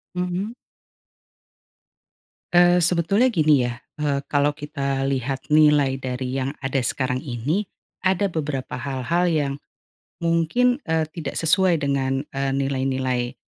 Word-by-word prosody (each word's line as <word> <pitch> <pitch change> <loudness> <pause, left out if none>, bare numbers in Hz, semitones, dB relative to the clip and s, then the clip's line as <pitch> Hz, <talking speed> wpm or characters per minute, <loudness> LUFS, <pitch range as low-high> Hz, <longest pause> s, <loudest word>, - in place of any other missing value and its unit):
Mhm. 180 +5 -2 2.0
Eee, 175 0 +6
sebetulnya 175 +8 +3
gini 155 - +3
ya, 120 - -4 0.2
eee, 140 -2 0
kalau 145 0 +2
kita 140 -2 -3
lihat 135 +1 -2
nilai 150 -3 +4
dari 130 0 -3
yang 135 +2 -3
ada 135 0 0
sekarang 125 +1 -1
ini, 145 - -2 0.3
ada 190 +1 +1
beberapa 145 -5 -3
hal-hal 140 +6 -1
yang, 145 -4 +1 0.7
mungkin, 205 - +2
eee, 160 -1 +2
tidak 155 -5 -5
sesuai 175 +1 +3
dengan, 135 -1 -1
eee, 135 0 -1
nilai-nilai, 130 -2 -1
145 Hz, 115 wpm, -23 LUFS, 135-170 Hz, 2.0 s, Eee